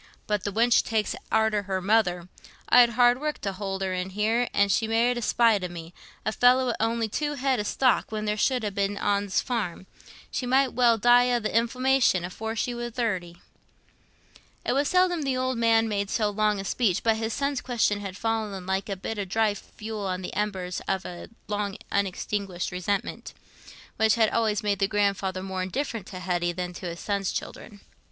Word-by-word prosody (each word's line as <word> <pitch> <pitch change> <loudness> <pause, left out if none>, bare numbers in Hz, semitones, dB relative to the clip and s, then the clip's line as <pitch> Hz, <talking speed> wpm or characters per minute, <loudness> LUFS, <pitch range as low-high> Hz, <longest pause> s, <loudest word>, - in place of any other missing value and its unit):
"But 210 -2 -1
the 205 - -1
wench 230 +3 +4
takes 220 -2 -1 0.2
arter 220 -1 +2
her 190 -1 -2
mother. 185 -3 +1 0.4
I'd 245 -1 +7
hard 245 +1 +5
work 300 0 -2
t' 195 - -2
hould 195 0 -4
her 190 -1 -1
in, 185 +1 -3
an' 215 -1 +2
she 220 +3 +1
married 235 +2 +2
i' - - -3
spite 225 -3 +3
o' - - -1
me—a 175 +4 -8
feller 250 +3 +4
wi' 245 - 0
on'y 225 0 0
two 295 +7 -2
head 265 -2 0
o' - - +1
stock 250 +4 +1
when 215 -1 -3
there 210 0 0
should 250 +3 +1
ha' 205 -2 -2
been 200 +1 0
ten - - -5
on's 200 -1 +1
farm—she 230 +2 -5
might 265 +1 +3
well 235 -1 +4
die 245 +3 +5
o' 240 - +2
th' 220 - -11
inflammation 235 -3 +2
afore 220 +5 -5
she 245 +2 -1
war 240 0 -4
thirty." 185 -8 -3 1.2
It - - +1
was 280 +2 +1
seldom 365 -2 +2
the 270 -3 -1
old 255 -1 -1
man 225 -1 +3
made 200 -2 -2
so 215 -2 0
long 210 0 +1
a 195 - -5
speech, 200 -4 0
but 225 -1 +3
his 225 0 -2
son's 280 +1 -1
question 225 -5 0
had 195 -2 -6
fallen 215 -4 -2
like 190 +2 -2
a 195 - -1
bit 210 +3 -5
of 195 -2 -4
dry 220 +1 +2
fuel 210 0 -7
on 185 0 -3
the - - -5
embers 190 -3 -2
of 190 -1 -1
a 175 -1 -8 0.2
long 205 -1 -2
unextinguished 195 -1 -2
resentment, 185 +2 -3 0.6
which 220 -1 +4
had 220 -2 +3
always 220 -1 +1
made 200 -2 0
the 195 - +2
grandfather 200 -2 0
more 190 -1 -3
indifferent 225 +1 -3
to 185 - -7
Hetty 175 -1 -1
than 180 0 -4
to 180 - -6
his 170 0 -6
son's 200 -2 -1
children. 205 -3 -7
210 Hz, 195 wpm, -26 LUFS, 195-235 Hz, 1.2 s, I'd